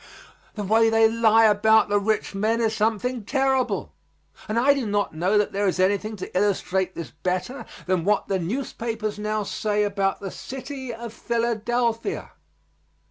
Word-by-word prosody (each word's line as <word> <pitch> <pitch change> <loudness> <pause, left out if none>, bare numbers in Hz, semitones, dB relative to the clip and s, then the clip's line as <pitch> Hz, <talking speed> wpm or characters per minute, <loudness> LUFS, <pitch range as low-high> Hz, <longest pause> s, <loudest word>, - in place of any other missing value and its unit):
The 210 - -3
way 225 +3 +4
they 225 0 +5
lie 225 0 +4
about 220 +1 +4
the 205 0 +2
rich 215 +1 -1
men 215 +4 0
is 225 -1 +1
something 225 +3 0
terrible, 265 +2 0 0.6
and 215 - -1
I 270 +4 +5
do 270 -5 -2
not 205 -3 0
know 180 +6 +1
that 210 - +1
there 200 +1 0
is 185 - 0
anything 200 +3 +1
to 190 - -8
illustrate 190 -1 0
this 170 - -6
better 185 - -3 0.2
than 180 -1 0
what 205 +3 +1
the 195 -1 0
newspapers 225 +1 -3
now 215 0 -1
say 210 +1 -1
about 200 -1 0
the 195 -2 -6
city 260 +5 -7
of 230 0 -7
Philadelphia. 235 - -1
215 Hz, 160 wpm, -24 LUFS, 200-230 Hz, 0.6 s, they